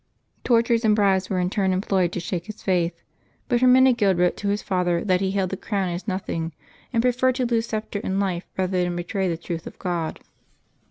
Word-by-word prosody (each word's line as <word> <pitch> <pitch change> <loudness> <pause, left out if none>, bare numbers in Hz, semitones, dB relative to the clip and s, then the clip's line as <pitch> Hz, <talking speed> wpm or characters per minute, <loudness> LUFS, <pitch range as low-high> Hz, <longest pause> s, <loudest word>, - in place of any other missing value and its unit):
Tortures 235 -1 +3
and 215 -1 +4
bribes 195 -3 +2
were 190 - -1
in 180 0 0
turn 195 -2 +1
employed 185 -1 +1
to - - -2
shake 175 +1 -4
his 215 0 -9
faith, 175 -3 0 0.4
but 240 -2 +1
Hermenegild 250 -7 +5
wrote 180 0 +2
to 205 - -4
his 205 +1 0
father 175 -2 0
that 185 -2 +2
he 190 - +1
held 190 -2 -1
the - - -1
crown 195 -3 -2
as 175 +4 -5
nothing, 170 -4 -3 0.4
and 230 -2 +1
preferred 250 +1 +2
to 255 -1 0
lose 230 -1 0
sceptre 215 -2 -3
and 190 +1 -1
life 185 -3 -1
rather 185 -1 0
than 175 0 -2
betray 185 +2 -2
the 165 - -2
truth 170 0 -6
of - - -10
God. 170 -4 -3
190 Hz, 210 wpm, -24 LUFS, 180-220 Hz, 0.4 s, Hermenegild